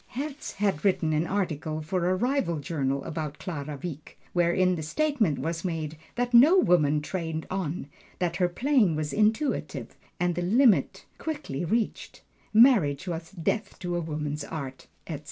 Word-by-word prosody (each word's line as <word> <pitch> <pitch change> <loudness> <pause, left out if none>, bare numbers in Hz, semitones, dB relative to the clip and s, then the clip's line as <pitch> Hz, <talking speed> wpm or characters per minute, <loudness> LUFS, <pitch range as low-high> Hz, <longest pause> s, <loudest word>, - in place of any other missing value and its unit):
Herz 285 +2 -5
had 195 -6 0
written 170 -5 +2
an 155 +3 +1
article 155 -5 -2
for 180 +2 0
a 185 - +2
rival 240 - 0
journal 140 -3 -2
about 150 -2 -4
Clara 150 -5 -5
Wieck, 155 -4 -7 0.2
wherein 175 +1 +3
the 170 - -3
statement 220 - +1
was 165 0 -3
made 160 -4 -3 0.2
that 245 0 -1
no 290 +11 +8
woman 150 - +3
trained 160 -2 -3
on, 180 -5 -2 0.3
that 175 -1 -1
her 180 -1 +2
playing 235 - +2
was 150 -1 -2
intuitive, 220 +7 0 0.2
and 175 0 +1
the 175 - -2
limit 225 +6 +3
quickly 175 - -4
reached 220 +6 -2 0.3
marriage 210 - +5
was 165 -1 -4
death 195 +4 -2
to 175 -2 -3
a 175 - 0
woman's 150 -2 -3
art, 140 -3 -7 0.2
etc. - - -5
175 Hz, 155 wpm, -27 LUFS, 155-210 Hz, 0.3 s, no